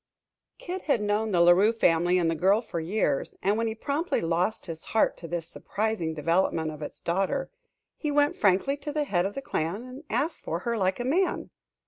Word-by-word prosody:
Kid 370 Hz, +1 st, -5 dB
had 275 Hz, -, +4 dB
known 210 Hz, +1 st, 0 dB
the 180 Hz, -4 st, +2 dB
La 170 Hz, 0 st, +7 dB
Rue 195 Hz, +5 st, +5 dB
family 175 Hz, -5 st, +3 dB
and 175 Hz, -2 st, +2 dB
the 165 Hz, -, +2 dB
girl 190 Hz, +6 st, +3 dB
for 220 Hz, -7 st, -5 dB
years, 160 Hz, -5 st, -1 dB
and 200 Hz, +2 st, +3 dB
when 230 Hz, +1 st, 0 dB
he 220 Hz, -, -3 dB
promptly 290 Hz, +9 st, -1 dB
lost 175 Hz, +6 st, 0 dB
his 165 Hz, -3 st, -7 dB
heart -, -, +4 dB
to 170 Hz, -, -9 dB
this 170 Hz, -1 st, -4 dB
surprising 200 Hz, -5 st, -2 dB
development 160 Hz, 0 st, +1 dB
of 155 Hz, 0 st, -10 dB
its 150 Hz, -, -7 dB
daughter, 195 Hz, +11 st, -1 dB, 0.5 s
he 300 Hz, -, -2 dB
went 290 Hz, 0 st, +3 dB
frankly 200 Hz, +7 st, +2 dB
to 285 Hz, +1 st, -6 dB
the 300 Hz, 0 st, 0 dB
head 190 Hz, -9 st, +1 dB
of 200 Hz, -, -8 dB
the 275 Hz, -, -5 dB
clan 175 Hz, +1 st, -2 dB
and 255 Hz, +3 st, -10 dB
asked 320 Hz, +4 st, -1 dB
for 165 Hz, +2 st, -3 dB
her 235 Hz, +2 st, -1 dB
like 190 Hz, -1 st, 0 dB
a -, -, -1 dB
man. 355 Hz, +8 st, 0 dB
200 Hz, 210 wpm, -27 LUFS, 170-250 Hz, 0.5 s, La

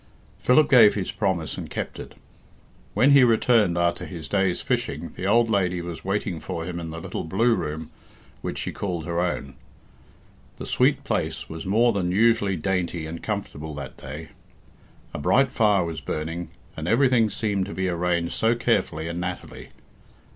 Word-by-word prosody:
Philip 150 Hz, +5 st, +4 dB
gave 115 Hz, -6 st, +7 dB
his 100 Hz, -3 st, -2 dB
promise 95 Hz, -7 st, -1 dB
and -, -, -7 dB
kept -, -, -5 dB
it. -, -, -9 dB, 0.8 s
When 135 Hz, +3 st, +5 dB
he 140 Hz, -2 st, +8 dB
returned 115 Hz, -6 st, +3 dB
after 85 Hz, 0 st, 0 dB
his 85 Hz, -5 st, -7 dB
day's 95 Hz, -1 st, +1 dB
fishing -, -, -2 dB
the 95 Hz, -, -3 dB
old 115 Hz, +3 st, +4 dB
lady 95 Hz, -5 st, +1 dB
was 85 Hz, -1 st, -6 dB
waiting 95 Hz, -3 st, -2 dB
for 85 Hz, -2 st, -5 dB
him 85 Hz, -1 st, -4 dB
in 85 Hz, -1 st, -5 dB
the 80 Hz, +1 st, -6 dB
little -, -, -5 dB
blue 110 Hz, +9 st, +2 dB
room 80 Hz, -4 st, -4 dB, 0.5 s
which -, -, -4 dB
she -, -, -3 dB
called 90 Hz, -5 st, -4 dB
her 85 Hz, -1 st, -2 dB
own. 85 Hz, -6 st, -2 dB, 1.0 s
The -, -, -6 dB
sweet -, -, +2 dB
place -, -, -2 dB
was 80 Hz, +3 st, -7 dB
more 115 Hz, +4 st, +3 dB
than 95 Hz, -3 st, -1 dB
usually 105 Hz, -1 st, +3 dB
dainty 90 Hz, -2 st, -1 dB
and 80 Hz, +1 st, -6 dB
comfortable 80 Hz, -8 st, -4 dB
that 70 Hz, -3 st, -7 dB
day. -, -, -8 dB, 0.8 s
A -, -, -4 dB
bright 130 Hz, -, +3 dB
fire 105 Hz, -5 st, +3 dB
was 85 Hz, -1 st, -5 dB
burning, 80 Hz, +2 st, -4 dB, 0.3 s
and 80 Hz, 0 st, -5 dB
everything 120 Hz, -1 st, +4 dB
seemed 100 Hz, -2 st, -1 dB
to -, -, -6 dB
be 95 Hz, 0 st, -1 dB
arranged 85 Hz, -1 st, 0 dB
so 115 Hz, +1 st, +2 dB
carefully 95 Hz, -9 st, 0 dB
and 85 Hz, +1 st, -4 dB
nattily. 90 Hz, 0 st, -6 dB
90 Hz, 170 wpm, -24 LUFS, 85-110 Hz, 1.0 s, he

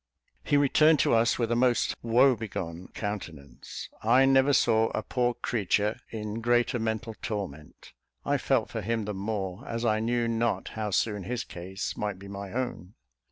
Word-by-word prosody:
He 145 Hz, -, +2 dB
returned 150 Hz, +3 st, +5 dB
to -, -, +2 dB
us 115 Hz, 0 st, +3 dB
with 115 Hz, -1 st, -1 dB
a -, -, +3 dB
most 125 Hz, 0 st, +2 dB
woe 125 Hz, +3 st, +4 dB
begone 90 Hz, -5 st, -6 dB
countenance. 85 Hz, -9 st, -6 dB
I 125 Hz, +4 st, +5 dB
never 135 Hz, +1 st, +4 dB
saw 115 Hz, -4 st, +3 dB
a 110 Hz, -, -2 dB
poor 120 Hz, 0 st, 0 dB
creature 105 Hz, -2 st, 0 dB
in 110 Hz, 0 st, -5 dB
greater 120 Hz, +1 st, +2 dB
mental 110 Hz, 0 st, -2 dB
torment. 100 Hz, -, -6 dB, 0.3 s
I -, -, +1 dB
felt -, -, +1 dB
for -, -, -3 dB
him 115 Hz, +1 st, -1 dB
the 105 Hz, -, -3 dB
more, 95 Hz, -2 st, -4 dB
as 115 Hz, 0 st, -3 dB
I 110 Hz, -1 st, +2 dB
knew 120 Hz, +1 st, 0 dB
not 115 Hz, 0 st, 0 dB
how 110 Hz, -1 st, -3 dB
soon 105 Hz, -1 st, 0 dB
his 125 Hz, +1 st, -2 dB
case 95 Hz, +3 st, -6 dB
might 105 Hz, -2 st, -3 dB
be 100 Hz, +1 st, -11 dB
my 100 Hz, -1 st, -7 dB
own. 105 Hz, -7 st, -4 dB
110 Hz, 170 wpm, -28 LUFS, 100-120 Hz, 0.3 s, returned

